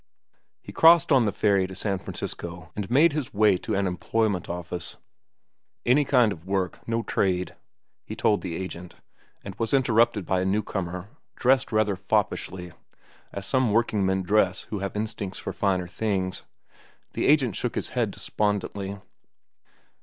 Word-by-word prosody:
He - - -9
crossed 165 0 +6
on 130 -4 +5
the 105 - +1
ferry 100 -1 +2
to 95 - -9
San 95 0 -2
Francisco 85 -1 -7
and 105 -1 -4
made 145 +6 +5
his 145 -8 -4
way 105 -2 +5
to 110 +3 -3
an 100 0 +1
employment 95 +1 -1
office. 85 0 -3 0.9
"Any 140 +4 +4
kind 125 -5 +4
of 85 -2 -8
work, 95 -1 -1
no 115 0 0
trade," 90 -4 0 0.5
he - - -7
told 105 - +2
the 90 -3 -4
agent; 90 -1 -7 0.5
and 100 - -7
was 115 +3 +1
interrupted 115 -5 +3
by 95 +1 +1
a - - -1
new 105 +3 +1
comer, 90 -1 -4 0.3
dressed 130 0 +2
rather 110 -2 +2
foppishly, 90 -1 -2 0.6
as 100 -1 -6
some 130 +2 +1
workingmen 100 -4 +1
dress 95 -1 +2
who 105 - -2
have 100 +1 -4
instincts 105 -3 -4
for - - -5
finer 95 -3 0
things. 95 0 -2 0.7
The - - 0
agent 135 -8 +3
shook - - -2
his - - -2
head - - 0
despondently. 100 -1 -2
100 Hz, 155 wpm, -26 LUFS, 95-115 Hz, 0.9 s, crossed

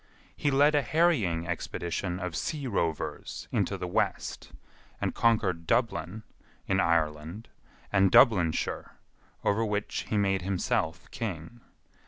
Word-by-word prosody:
He 145 - 0
led 145 +2 +4
a 145 - +4
harrying 135 - +2
expedition 85 +1 -3
of 90 -3 -4
sea 145 - -3
rovers 85 -9 -3
into - - 0
the - - -4
west, - - -2 0.5
and - - -1
conquered 95 -8 +1
Dublin, 110 -4 0 0.4
in 95 - +1
Ireland, 80 +3 0 0.4
and 95 -1 +4
Dublinshire, 90 -11 +3 0.5
over 110 +3 +2
which 105 -1 -2
he 105 - +1
made 95 -2 +2
himself 90 -2 -1
king. 105 +1 -5
95 Hz, 120 wpm, -29 LUFS, 85-115 Hz, 0.5 s, led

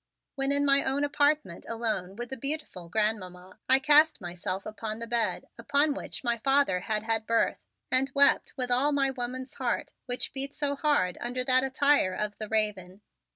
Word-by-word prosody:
When 270 0 0
in 285 0 +2
my 275 0 +4
own 270 +2 0
apartment, 290 - 0
alone 220 -5 -3
with 240 +3 -7
the - - -3
beautiful 275 - -3
Grandmamma, 185 -3 -2
I 260 - +7
cast 300 +3 +5
myself 180 +2 -5
upon 215 0 -5
the 230 - -6
bed 230 0 -1
upon 285 +1 +2
which - - -6
my 235 -1 0
father 270 -7 +2
had 215 +3 -2
had 225 -1 -1
birth, 230 0 +1 0.3
and 265 +2 +2
wept 280 0 +4
with 250 -1 -2
all 275 +4 +3
my 275 -1 +2
woman's 255 +1 -5
heart 250 -3 -2 0.2
which 245 0 -1
beat 275 +1 -3
so 285 -1 -1
hard 280 - 0
under 250 +1 -2
that 255 0 +3
attire 270 -7 +2
of 210 -1 -3
the 215 -1 -5
raven. 205 -3 -2
245 Hz, 180 wpm, -28 LUFS, 215-280 Hz, 0.3 s, I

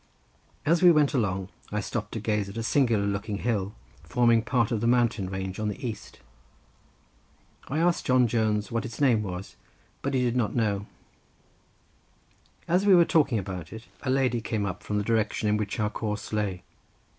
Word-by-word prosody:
As 170 +3 +3
we 180 -1 +8
went 150 -3 +3
along 95 -7 -1 0.2
I - - -1
stopped - - -4
to - - -3
gaze 105 -2 -1
at 100 - -8
a 115 - -2
singular 115 -5 +2
looking 100 +1 -2
hill 105 -3 -2 0.3
forming 115 +8 +3
part 120 -1 0
of 110 -3 0
the 115 - +1
mountain 115 -5 +2
range 95 0 -4
on 110 - -1
the 105 +5 -4
east. 110 -3 -8 1.5
I 140 - -3
asked 170 +1 +1
John 125 -1 +5
Jones 110 -3 0
what 115 0 -1
its 120 -3 -7
name 125 -7 +4
was, 95 -2 -6 0.4
but 140 0 -1
he 130 - +2
did 120 -1 0
not 120 -4 0
know. 105 -4 0 1.8
As 180 +3 +2
we 200 -2 +6
were 175 - +7
standing - - -6
talking 140 -7 +3
about 90 -5 -5
it, 110 0 -8 0.2
a 135 - -3
lady 130 -3 +1
came 110 -2 -2
up 95 +1 -4
from 105 0 -3
the 105 - 0
direction 110 -1 0
in 105 - +3
which 105 +1 -3
our 105 0 0
course 105 0 -4
lay. 100 -4 -2
110 Hz, 190 wpm, -27 LUFS, 100-125 Hz, 1.8 s, we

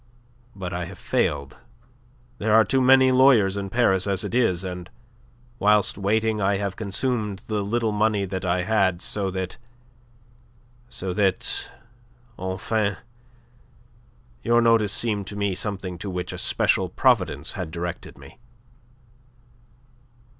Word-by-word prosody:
But 95 -2 -6
I 90 0 -3
have 95 +2 -10
failed. 70 -1 -1 0.8
There 110 +1 +2
are 110 - +6
too 135 -1 +1
many 130 0 +6
lawyers 125 -7 +5
in 100 -1 -4
Paris 95 -4 +2
as 95 -1 +1
it - - -5
is, 105 -8 +2
and 90 -1 -6 0.7
whilst 105 0 +3
waiting 105 +2 0
I 100 +1 +2
have 100 -1 -3
consumed 105 -1 -2
the 105 -2 -2
little 115 +2 -1
money 105 -1 +1
that 95 -1 -5
I 90 0 0
had, 95 -4 +1
so 100 -2 -1
that... 95 -1 -4 1.3
so 95 -6 -4
that, 95 -1 0 0.7
enfin, 100 +2 -1 1.4
your 120 +1 +3
notice 115 -3 +3
seemed 105 -4 0
to 100 - -7
me 100 -1 -1
something 95 -2 -4
to 100 - -5
which 90 -1 -4
a - - -6
special - - +2
providence - - +1
had - - -5
directed 85 +1 -6
me." - - -15
100 Hz, 130 wpm, -24 LUFS, 95-110 Hz, 1.4 s, are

